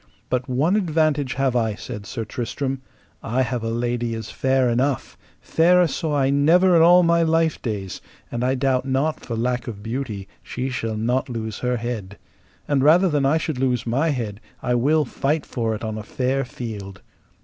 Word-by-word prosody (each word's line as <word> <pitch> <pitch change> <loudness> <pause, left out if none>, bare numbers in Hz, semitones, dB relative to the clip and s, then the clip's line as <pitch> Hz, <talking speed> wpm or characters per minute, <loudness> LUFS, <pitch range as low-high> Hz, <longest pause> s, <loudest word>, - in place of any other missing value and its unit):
But 125 +1 -1
one 145 +10 +2
advantage 155 -7 +1
have 135 -1 +1
I, 110 -3 +1
said 105 -3 -8
Sir 115 -3 -4
Tristram, 130 +4 -3 0.4
I 125 +4 0
have 120 -2 -3
a 115 - -1
lady 120 0 -1
is 110 -1 -6
fair 130 -1 +2
enough, 125 +2 0 0.3
fairer 180 +2 +4
saw 155 -1 -1
I 135 -1 +2
never 170 +6 +4
in 165 - +6
all 175 +2 +7
my 170 0 +3
life 165 -1 +2
days, 100 -5 -4 0.3
and 120 0 -2
I 130 +1 +2
doubt 130 -1 +1
not 135 +4 0
for 120 - -5
lack 120 +2 -1
of 105 -3 -7
beauty 115 -4 -4
she 130 +1 -4
shall 115 -3 -3
not 125 +5 0
lose 110 -3 -4
her 125 0 0
head; 115 -5 -5 0.5
and 140 -2 +2
rather 175 +6 +5
than 145 -3 +2
I 150 +4 +3
should 155 -4 -3
lose 125 -3 0
my 135 +8 +1
head 115 -7 -3 0.2
I 125 - +1
will 145 +6 +3
fight 145 +4 -1
for 115 -3 -2
it 110 - -8
on 110 -1 -3
a - - -6
fair 130 +4 -1
field. 105 -6 -7
130 Hz, 190 wpm, -22 LUFS, 115-145 Hz, 0.5 s, all